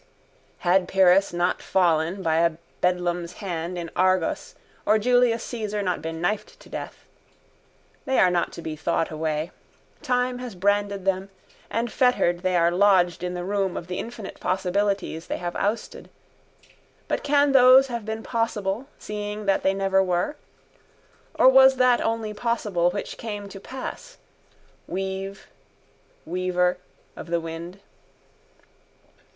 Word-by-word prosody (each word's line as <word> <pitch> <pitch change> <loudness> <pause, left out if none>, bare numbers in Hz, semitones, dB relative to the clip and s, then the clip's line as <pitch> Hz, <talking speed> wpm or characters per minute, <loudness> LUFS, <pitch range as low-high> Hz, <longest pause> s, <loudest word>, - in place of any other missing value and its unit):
Had 180 +1 +3
Pyrrhus 190 +1 +4
not 175 +1 0
fallen 175 0 +1
by 160 -1 +2
a 165 0 +3 0.3
beldam's 175 -1 0
hand 175 -2 -4
in 170 -1 -5
Argos 185 -2 +1 0.3
or 215 - +4
Julius 245 0 +3
Caesar 210 -3 -3
not 180 -4 -1
been 160 +1 -5
knifed 200 +5 -2
to - - -16
death. - - -7 1.0
They 265 -2 +1
are 180 - +5
not 175 -1 0
to 170 - -8
be 155 - -4
thought 165 +1 -1
away. 155 +1 -2 0.5
Time 250 0 0
has 250 -5 -7
branded 200 +1 0
them 195 0 0 0.4
and 230 +1 -2
fettered 250 -9 +2
they 185 0 0
are 170 0 +4
lodged 180 -2 +3
in 180 0 -3
the 175 - -4
room 195 -1 -1
of - - -5
the 180 +1 -4
infinite 230 -3 -7
possibilities 190 -2 -1
they - - -2
have 175 0 -5
ousted. 210 +3 -3 1.0
But - - -1
can 285 0 +3
those 260 0 +7
have 235 -4 -5
been 220 +1 -5
possible 225 0 -2
seeing 210 0 -5
that 195 -1 +2
they 190 0 +1
never 195 0 +2
were? 180 - -1 1.0
Or - - +5
was 265 0 +7
that 255 -1 +4
only 225 -1 -1
possible 210 -6 0
which 200 +3 -5
came 205 -3 -5
to 195 - -9
pass? 385 - -8 0.7
Weave, 190 +1 -4 0.8
weaver 180 0 0 0.4
of - - -9
the 170 0 0
wind. 165 +3 -7
195 Hz, 140 wpm, -24 LUFS, 175-220 Hz, 1.0 s, those